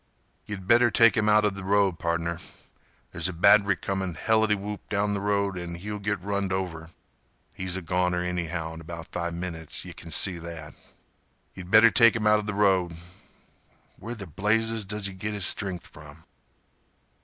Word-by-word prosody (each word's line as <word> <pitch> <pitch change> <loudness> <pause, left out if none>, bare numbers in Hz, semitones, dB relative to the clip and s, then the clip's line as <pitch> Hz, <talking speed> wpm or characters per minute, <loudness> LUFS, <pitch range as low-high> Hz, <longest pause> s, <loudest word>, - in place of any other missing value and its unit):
"Ye'd 100 -3 -6
better 120 +4 +5
take 115 0 +5
'im 105 -2 +1
outa 105 -1 +4
th' 95 0 -8
road, 100 -2 +1
pardner. 85 0 -2 0.7
There's 85 +2 -1
a - - -5
batt'ry 100 +3 +4
comin' 95 -3 -3
helitywhoop 105 +1 0
down 105 0 0
th' 100 - -2
road 100 -2 -1
an' 85 -1 -6
he'll 105 +4 -6
git 105 -1 -2
runned 100 -1 -2
over. 85 -4 -4 0.6
He's 95 -1 -2
a 95 - -6
goner 90 +1 0
anyhow 85 -2 -3
in 80 - -9
about 85 0 -9
five 85 -1 -4
minutes—yeh 85 -3 -6
kin 85 - -11
see 90 +1 +1
that. 80 -3 -8 0.8
Ye'd 90 -1 -10
better 110 +3 +7
take 115 0 +5
'im 110 -2 -2
outa 105 0 +2
th' - - -6
road. 95 -4 +2 1.0
Where 115 +4 -6
th' 95 -9 -10
blazes 110 +1 +1
does 105 +1 -2
hi 100 - -3
git 105 +3 -5
his 100 -3 +3
stren'th 95 -2 +3
from?" 75 +2 -14
95 Hz, 165 wpm, -26 LUFS, 85-105 Hz, 1.0 s, better